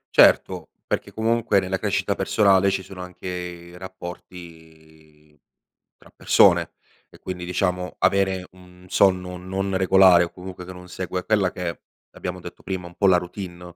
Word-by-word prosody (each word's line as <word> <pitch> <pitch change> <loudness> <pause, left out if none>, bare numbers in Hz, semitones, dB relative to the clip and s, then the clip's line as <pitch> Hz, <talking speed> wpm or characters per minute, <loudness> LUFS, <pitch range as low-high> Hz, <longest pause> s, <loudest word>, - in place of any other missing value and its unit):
Certo, - - +4 0.2
perché - - -3
comunque 115 -2 +1
nella 95 0 -2
crescita - - 0
personale 100 -2 +3
ci 95 -1 -2
sono 95 0 -10
anche 90 0 -9
i 90 -1 -6
rapporti 80 -4 -12 0.6
tra - - -19
persone - - +4 0.4
e - - -17
quindi 90 -1 -6
diciamo 90 0 -2
avere 95 0 +1
un 90 0 -18
sonno 90 -1 +2
non 95 +1 -3
regolare 95 -2 +6
o 85 - -7
comunque 90 0 -9
che 95 - -9
non 90 0 -12
segue 90 0 -5
quella 105 -3 +2
che 90 -2 -4
è, 85 - -5 0.3
abbiamo 90 0 -6
detto 85 0 -11
prima, 95 -2 -4
un 85 - -13
po' 100 - +2
la 90 -2 +6
routine, 90 0 -7
90 Hz, 155 wpm, -23 LUFS, 90-95 Hz, 0.6 s, regolare